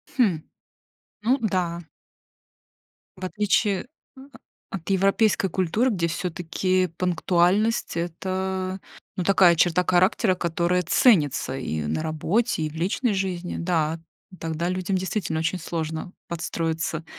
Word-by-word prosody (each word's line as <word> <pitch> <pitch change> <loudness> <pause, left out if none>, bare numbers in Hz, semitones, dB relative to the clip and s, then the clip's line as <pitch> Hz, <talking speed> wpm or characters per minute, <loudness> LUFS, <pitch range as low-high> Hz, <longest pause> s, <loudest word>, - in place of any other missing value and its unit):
Хм. 200 - +3 0.8
Ну 245 +5 +3
да. 180 -5 0 1.4
В 185 - -5
отличие 205 0 +1 0.3
о 265 - -12 0.5
от 180 0 -7
европейской 195 +1 +2
культуры, 190 +9 +1
где 170 -5 0
всё-таки 180 +2 -1
пунктуальность 180 +4 +1
это, 185 +2 -3 0.4
ну 185 - -2
такая 185 -2 +6
черта 175 +2 +3
характера, 185 +3 +3
которая 175 0 0
ценится 155 - +3
и 80 - -3
на 80 +1 -1
работе, 165 +6 0
и 155 - -1
в 150 - -13
личной 195 +8 0
жизни, 185 -2 -2
да. 165 -2 0 0.4
Тогда 165 +1 -2
людям 185 +1 -1
действительно 185 -3 -2
очень 170 +3 -1
сложно 160 +1 -4 0.2
подстроиться 165 -1 -3
180 Hz, 115 wpm, -24 LUFS, 165-190 Hz, 1.4 s, такая